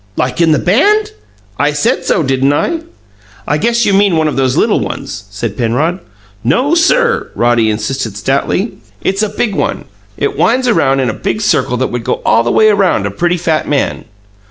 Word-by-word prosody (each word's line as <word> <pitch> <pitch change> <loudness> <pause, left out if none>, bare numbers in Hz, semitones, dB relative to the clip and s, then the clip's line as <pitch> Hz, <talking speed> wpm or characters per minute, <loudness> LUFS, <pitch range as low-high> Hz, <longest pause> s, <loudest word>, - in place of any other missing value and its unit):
"Like 125 +6 -1
in 165 -1 +4
the 155 - +4
BAND?" 415 - +2 0.5
"I 145 +1 +1
said 150 - 0
so, 170 - +1
didn't 135 +1 +1
I?" 330 - 0 0.7
"I 145 +2 0
guess 235 +4 +1
you 200 - +2
mean 195 -3 +3
one 155 -1 +2
of 150 - -2
those 130 -1 0
little - - +2
ones," - - -6
said 105 +1 -5
Penrod. 135 - 0 0.4
"No, 255 - +1
sir!" 470 +7 +2
Roddy 120 -2 +2
insisted 110 0 -3
stoutly; 140 - -1 0.2
"it's 195 +2 0
a 215 - 0
big 210 +1 -2
one! - - -2 0.3
It 415 -1 -1
winds 250 +2 +1
around 135 - +2
in 125 - 0
a - - -7
big 215 - -3
circle 205 - +1
that 130 - -1
would 120 -1 -3
go - - -1
all 115 - +4
the 120 - -1
way 215 - +4
around 195 - +2
a 100 - -2
pretty 175 - 0
fat 160 -2 -1
man." 145 -2 -1
155 Hz, 195 wpm, -13 LUFS, -, 0.7 s, in